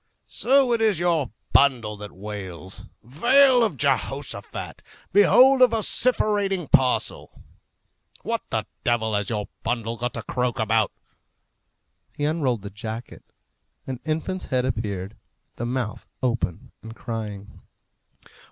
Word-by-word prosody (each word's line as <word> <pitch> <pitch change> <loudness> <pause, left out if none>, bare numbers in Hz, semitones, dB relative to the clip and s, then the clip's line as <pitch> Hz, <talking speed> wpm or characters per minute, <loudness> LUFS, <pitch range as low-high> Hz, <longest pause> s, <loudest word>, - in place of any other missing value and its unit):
"So 265 -1 +3
it 230 - 0
is 215 -5 +3
your 165 -7 +1 0.2
bundle 120 -7 +3
that 105 0 -8
wails! 95 -2 -8 0.2
Vale 245 - +5
of 210 -11 -1
Jehoshaphat! 135 -5 -2 0.3
Behold 255 +6 +6
a 255 - +9
vociferating 210 - +1
parcel! 130 -1 +1 0.8
What - - -1
the - - -1 0.2
devil 115 -2 +1
has 105 -1 0
your 105 -2 -2
bundle 115 0 -2
got 120 +1 -3
to 115 - -5
croak 125 -1 -1
about?" 110 -1 +1 1.2
He 145 - -2
unrolled 140 -9 0
the 100 - -7
jacket. 110 +3 -7 0.6
An 130 -2 -5
infant's 160 +4 -2
head 130 -1 0
appeared, 105 -5 -3 0.4
the 120 - -3
mouth 120 -3 -3 0.2
open 115 -9 -2
and 115 +1 -10
crying. 105 -4 -6
125 Hz, 120 wpm, -24 LUFS, 110-175 Hz, 1.2 s, a